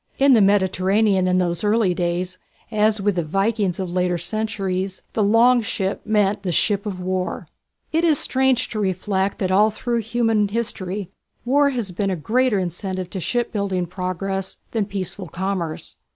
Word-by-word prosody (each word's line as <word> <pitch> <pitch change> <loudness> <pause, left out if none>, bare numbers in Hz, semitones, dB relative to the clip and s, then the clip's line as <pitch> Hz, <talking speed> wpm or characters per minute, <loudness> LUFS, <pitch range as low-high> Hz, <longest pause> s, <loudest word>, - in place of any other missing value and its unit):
In 275 0 +5
the 225 - +6
Mediterranean 195 0 +3
in 180 0 +2
those 175 -1 0
early 210 -3 +2
days, 180 +1 -2 0.3
as 215 0 +2
with 200 -1 0
the 170 - +1
Vikings 195 +3 0
of 180 -2 -3
later 180 -1 +1
centuries, 195 -1 -3
the 220 - 0
"Long 235 +4 +5
Ship" 195 -3 -2
meant 210 -1 +1
the 185 -3 -2
ship 205 +4 +1
of 190 -3 -4
war. 185 0 -3 0.4
It 325 +2 +1
is 320 -4 +4
strange 260 -2 +2
to 220 - -4
reflect 190 0 -1
that 185 -1 -1
all 210 +3 +5
through 235 +2 -2
human 225 -2 +1
history 200 -3 -3 0.3
war 280 +3 +4
has 235 -8 -3
been 195 +2 -1
a 190 - 0
greater 230 - +1
incentive 185 0 -3
to 190 - -4
shipbuilding 200 -4 -1
progress 185 +2 -3
than 220 -3 0
peaceful 195 -1 -5
commerce. 175 -2 -4
195 Hz, 165 wpm, -22 LUFS, 185-220 Hz, 0.4 s, the